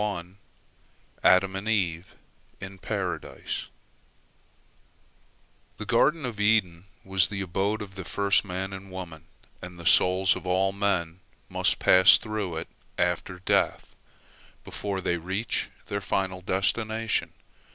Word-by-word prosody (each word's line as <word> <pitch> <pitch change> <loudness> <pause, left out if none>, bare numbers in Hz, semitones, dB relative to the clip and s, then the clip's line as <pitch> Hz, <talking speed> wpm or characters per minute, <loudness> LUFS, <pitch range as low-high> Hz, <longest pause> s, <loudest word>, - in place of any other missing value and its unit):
ADAM 95 +1 +4
AND 100 +3 -3
EVE 90 -5 -1 0.4
IN 95 0 -9
PARADISE - - -4 2.1
The 105 - -5
Garden 140 +6 +2
of 115 -4 -5
Eden 100 -5 +2 0.2
was 95 -3 +4
the 100 -1 -4
abode 100 +4 -1
of 95 -1 -11
the 95 -1 -7
first 100 +3 +2
man 95 0 -4
and 95 0 -9
woman, 85 -4 -8 0.4
and 90 -1 -9
the 85 - -10
souls 95 +3 +4
of - - -8
all 95 +1 +2
men 95 -4 -1 0.3
must - - +1
pass 95 0 +7
through 105 -6 -4
it 80 - -5 0.3
after 90 +1 -1
death, - - 0 0.7
before 100 -2 -4
they 85 -1 0
reach 95 +6 -2 0.2
their 100 0 -3
final 95 -1 -2
destination. 110 +4 0
95 Hz, 120 wpm, -27 LUFS, 90-100 Hz, 2.1 s, pass